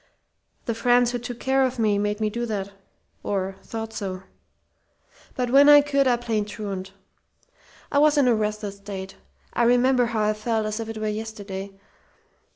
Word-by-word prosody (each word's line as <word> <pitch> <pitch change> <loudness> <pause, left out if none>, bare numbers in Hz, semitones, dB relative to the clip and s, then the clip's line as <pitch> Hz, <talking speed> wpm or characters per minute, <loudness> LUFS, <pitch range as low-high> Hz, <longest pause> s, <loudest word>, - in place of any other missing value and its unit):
The 230 - -1
friends 245 +1 +3
who 245 - -2
took 240 0 -7
care 265 0 +2
of 260 0 -1
me 210 -3 +2
made 210 +1 -1
me 215 -1 0
do 235 +2 -3
that... 200 -3 -3 0.5
or 195 -1 -2
thought 225 -1 -6
so. 190 -3 -5 1.1
"But 250 -2 -1
when 280 +2 +7
I 290 0 +9
could, 280 -1 +1
I 245 -1 +3
played 225 -3 -2
truant. 200 -3 -6 1.0
I 285 - +3
was 300 0 +4
in 280 -3 +4
a 245 - +5
restless 210 -2 -2
state. 195 -1 -8 0.4
I - - 0
remember 245 +1 +4
how 225 -2 -1
I 210 0 +2
felt 220 0 -1
as 215 +1 -3
if 225 -1 -5
it 225 - -6
were 215 0 -2
yesterday. 205 -3 -6
220 Hz, 175 wpm, -24 LUFS, 205-245 Hz, 1.1 s, I